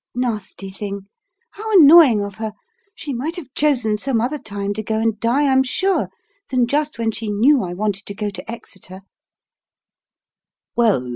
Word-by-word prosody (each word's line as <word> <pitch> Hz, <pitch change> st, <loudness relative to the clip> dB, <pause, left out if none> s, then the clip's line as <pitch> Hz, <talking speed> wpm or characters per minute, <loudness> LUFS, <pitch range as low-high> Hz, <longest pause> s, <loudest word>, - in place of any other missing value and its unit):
Nasty 215 Hz, -5 st, -3 dB
thing! 200 Hz, 0 st, -5 dB, 0.5 s
How 440 Hz, +2 st, -6 dB
annoying 290 Hz, -9 st, +8 dB
of 200 Hz, 0 st, -6 dB
her! 220 Hz, -1 st, -3 dB, 0.4 s
She 290 Hz, -8 st, -5 dB
might 290 Hz, +8 st, -3 dB
have 295 Hz, -8 st, -9 dB
chosen 245 Hz, -8 st, +1 dB
some 250 Hz, +1 st, 0 dB
other 260 Hz, +6 st, -1 dB
time 200 Hz, -2 st, -4 dB
to 215 Hz, -, -4 dB
go 220 Hz, 0 st, -2 dB
and 220 Hz, -1 st, 0 dB
die, 255 Hz, +6 st, +2 dB
I'm 265 Hz, -1 st, +4 dB
sure, 375 Hz, +9 st, 0 dB, 0.4 s
than 255 Hz, -2 st, +2 dB
just 290 Hz, 0 st, -1 dB
when 225 Hz, -1 st, 0 dB
she 220 Hz, 0 st, -5 dB
knew 245 Hz, +7 st, +4 dB
I 175 Hz, -2 st, -4 dB
wanted 205 Hz, 0 st, -2 dB
to 200 Hz, -, -5 dB
go 210 Hz, 0 st, -3 dB
to 190 Hz, +3 st, -8 dB
Exeter!" 195 Hz, -5 st, -8 dB
230 Hz, 160 wpm, -20 LUFS, 205-275 Hz, 0.5 s, annoying